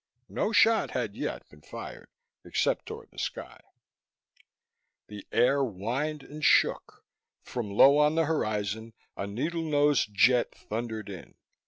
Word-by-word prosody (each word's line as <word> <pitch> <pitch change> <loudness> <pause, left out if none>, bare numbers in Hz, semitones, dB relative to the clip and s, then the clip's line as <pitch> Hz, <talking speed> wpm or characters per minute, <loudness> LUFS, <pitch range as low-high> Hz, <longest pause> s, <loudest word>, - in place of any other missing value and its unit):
No 215 - -1
shot 225 0 +4
had 115 -5 -3
yet - - -5
been 75 - -18
fired, 70 - -9 0.3
except - - -1
toward - - -9
the - - -11
sky. - - -5 1.5
The 105 -1 -10
air 135 +4 +3
whined 130 +8 -3
and 150 +1 -10
shook. - - +2 0.4
From 120 -4 -5
low 135 +8 +6
on 150 +1 +3
the 165 0 +2
horizon, 110 -6 -2 0.2
a 100 - -4
needle 150 +12 -3
nosed 145 -5 +2
jet 120 +5 +3
thundered 110 -1 -5
in. 95 -4 -10
125 Hz, 135 wpm, -28 LUFS, 105-150 Hz, 1.5 s, low